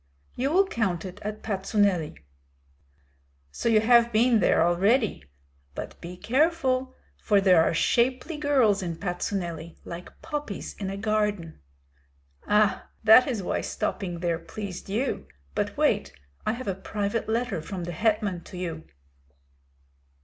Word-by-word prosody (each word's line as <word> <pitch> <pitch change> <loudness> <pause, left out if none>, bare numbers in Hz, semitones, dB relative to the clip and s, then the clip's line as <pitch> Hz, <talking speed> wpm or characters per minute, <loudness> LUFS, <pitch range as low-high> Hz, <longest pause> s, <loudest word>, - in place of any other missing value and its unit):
"You 265 +3 -1
will 375 +6 +4
count 195 - -1
it 185 +2 -8
at 210 +1 -5
Patsuneli." 195 - 0 1.3
"So 235 - -1
you 220 -2 +5
have 235 +1 +5
been 230 +1 +4
there 175 - +4
already? 200 - +2 0.5
But - - -7
be 180 +1 -8
careful; 260 - +1 0.3
for 205 -3 +3
there 185 -4 +5
are - - +2
shapely 255 - +1
girls 260 -9 +3
in 170 -3 -3
Patsuneli, 175 -3 -4
like 170 +1 -9
poppies 295 -9 -5
in 195 -2 -3
a 195 - -4
garden." 210 -5 -1 0.9
"Ah, 210 -1 +2
that 220 +3 +8
is 230 -7 -2
why - - -1
stopping 175 -4 -3
there 170 -2 0
pleased 195 +1 -7
you! 235 +7 -2 0.3
But - - -2
wait, - - +2 0.4
I - - +2
have 255 0 -7
a 195 - +1
private 205 +3 -3
letter 225 -6 -1
from 180 +2 -6
the 175 - -4
hetman 210 -1 0
to 180 - -10
you." 165 -3 -5
210 Hz, 140 wpm, -26 LUFS, 180-235 Hz, 1.3 s, that